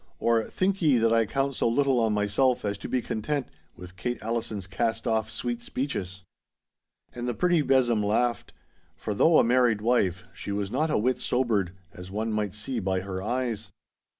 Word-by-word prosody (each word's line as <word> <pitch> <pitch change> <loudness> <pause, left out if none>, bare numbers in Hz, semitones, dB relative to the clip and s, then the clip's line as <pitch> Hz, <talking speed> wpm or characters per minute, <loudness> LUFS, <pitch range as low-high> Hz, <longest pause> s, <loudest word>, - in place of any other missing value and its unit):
or 115 -1 +2
"Think 195 +1 -1
ye 150 -6 +4
that 115 0 +3
I 115 -1 +3
count 135 +2 0
so - - 0
little 135 +1 +2
on 110 -1 +2
myself 105 +5 +1
as 100 0 -1
to - - -7
be 125 -2 0
content 140 +5 -2 0.3
with 90 +1 -11
Kate 120 +7 -3
Allison's 115 -3 -3
cast 115 +4 -2
off 110 -1 0
sweet 120 +1 -3
speeches."' 95 -8 -4 0.9
And 120 0 -5
the 120 - -1
pretty 175 +1 +3
besom 130 -5 +3
laughed. 115 +4 0 0.4
For 105 - -4
though 160 +10 +5
a - - +6
married 120 -3 +3
wife, 95 -6 +1
she - - -6
was 100 0 -2
not 160 +1 +1
a - - +2
whit 125 +3 +1
sobered, 110 -10 0 0.2
as 90 -1 -10
one 110 +3 -2
might 105 -2 -2
see 115 +4 -3
by 95 -2 -1
her 95 -1 -5
eyes. 115 0 -2
115 Hz, 185 wpm, -27 LUFS, 105-125 Hz, 0.9 s, a